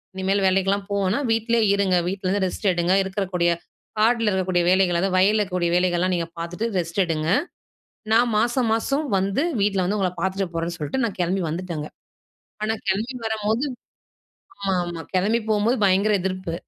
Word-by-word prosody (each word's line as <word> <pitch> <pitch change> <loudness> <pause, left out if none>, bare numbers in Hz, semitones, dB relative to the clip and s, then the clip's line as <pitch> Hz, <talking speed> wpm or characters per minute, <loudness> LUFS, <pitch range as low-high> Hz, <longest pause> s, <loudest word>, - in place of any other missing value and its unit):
இனிமேல் 195 +1 0
வேலைக்குலாம் 195 +1 +1
போ 200 - -1
வேணாம், 210 +10 0
வீட்லேயே 225 0 +2
இருங்க. 195 -2 +2
வீட்லருந்து 195 +1 -1
ரெஸ்ட் 200 - -4
எடுங்க. 175 +1 +1
இருக்கிறக்கூடிய 190 -3 0 0.5
காடுல 225 0 +3
இருக்கக்கூடிய 185 -2 +1
வேலைகள், 185 -2 +3
அதாவது 190 +1 0
வயலில்லக்கக்கூடிய 185 -3 +2
வேலைகள்லாம் 180 0 +1
நீங்க 170 -1 -2
பார்த்துட்டு, 175 +7 -3
ரெஸ்ட் 170 +2 -3
எடுங்க. 160 -2 -2 0.8
நான் 235 +1 +4
மாசம், 240 +2 +1
மாசம் 275 +7 0
வந்து 195 +8 0 0.2
வீட்ல 195 -2 +1
வந்து 205 +4 0
உங்கள 185 -2 +1
பாத்துட்டு 190 +1 -1
போறேன்னு 165 +1 -2
சொல்லிட்டு, 160 - -2
நான் 220 - -4
கிளம்பி 180 +2 0
வந்துட்டேன்ங்க. 165 -2 -4 0.7
ஆனா 220 +1 +1 0.2
கிளம்பி 215 +7 -1
வரம்போது 220 +3 0 1.0
ஆமா, 195 -1 -1
ஆமா. 175 -1 -6
கிளம்பி 200 +5 +2
போம்போது 220 +4 +2
பயங்கர 195 +3 +3
எதிர்ப்பு. 185 -2 -3
190 Hz, 150 wpm, -23 LUFS, 180-215 Hz, 1.0 s, நான்